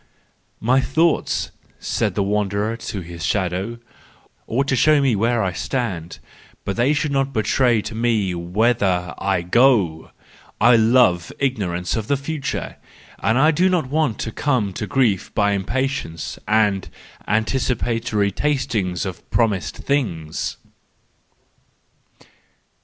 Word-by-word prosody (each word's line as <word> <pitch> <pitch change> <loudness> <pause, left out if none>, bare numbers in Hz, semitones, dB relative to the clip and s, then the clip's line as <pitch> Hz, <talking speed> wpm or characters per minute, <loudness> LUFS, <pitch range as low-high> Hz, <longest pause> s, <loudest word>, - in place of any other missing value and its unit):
— - - -40
11 - - -7
My 130 +3 +4
thoughts," 160 +6 +1 0.3
said - - -1
the 100 - +1
wanderer 105 +2 0
to 105 -4 -5
his 85 -1 -8
shadow, 95 +5 -1 0.4
" - - -35
ought 135 +4 0
to 130 - +2
show 150 +4 +4
me 135 -5 +2
where 115 +2 +1
I 95 - 0
stand, 95 -9 -3 0.5
but 100 - -2
they 120 +4 +2
should 150 0 0
not 135 0 0
betray 115 0 +2
to - - -6
me 110 -5 0
whither 90 +1 0
I 95 -3 0
go. 95 -6 +3 0.5
I 120 +3 +6
love 110 -7 +3
ignorance 95 -10 -1
of 110 -2 -3
the 140 - +2
future, 140 0 -4 0.4
and 135 +9 +3
do 185 +4 +3
not 165 -8 0
want 150 -7 +1
to 115 - -3
come 110 -7 0
to 105 - -4
grief 120 -9 +1
by 100 -1 +3
impatience 100 - -2
and 105 -3 +2 0.4
antici¬ 110 +4 +1
patory 115 -4 0
tasting 115 -11 -1
of 95 -3 -6
promised 105 -6 0
things." 90 - -2
110 Hz, 135 wpm, -21 LUFS, 95-130 Hz, 0.5 s, I